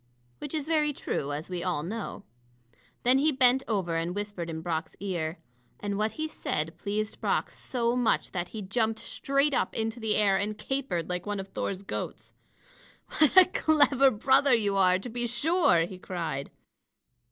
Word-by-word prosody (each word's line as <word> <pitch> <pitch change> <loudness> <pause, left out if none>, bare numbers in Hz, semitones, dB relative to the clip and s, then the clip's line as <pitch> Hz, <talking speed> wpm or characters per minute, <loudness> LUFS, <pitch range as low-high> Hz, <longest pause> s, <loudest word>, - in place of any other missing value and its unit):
Which 295 - -5
is 300 -3 -2
very 305 -2 +1
true, 145 - -3
as 150 +2 -4
we 180 -1 -4
all 175 -5 -1
know. 210 +2 -5 0.8
Then 255 +2 +5
he 305 +3 +3
bent 260 -1 +4
over 185 -7 0
and 170 +2 -2
whispered 205 -5 -4
in 160 -1 -5
Brock's 160 -1 -3
ear. 175 -4 -3 0.4
And 205 -1 -3
what 215 +2 0
he 315 0 -3
said 165 - -2
pleased 210 +1 -3
Brock - - 0
so 235 -1 -1
much 245 -2 +1
that 175 -1 -3
he 215 +2 -7
jumped 220 +3 0
straight 275 +5 0
up - - 0
into 225 +1 -2
the 220 -2 0
air 200 -2 +3
and 210 +2 -2
capered 255 - -2
like 180 +1 -4
one 205 -1 -2
of 195 0 -6
Thor's 195 0 -4
goats. - - -6 0.9
"What 310 +3 +4
a 375 - +11
clever 290 -6 +4
brother 265 +3 +4
you 205 -3 0
are, 185 -1 +4
to 195 - -7
be 240 0 -3
sure!" 280 - +3
he 185 0 -9
cried. 165 -7 -4
210 Hz, 175 wpm, -28 LUFS, 180-265 Hz, 0.9 s, a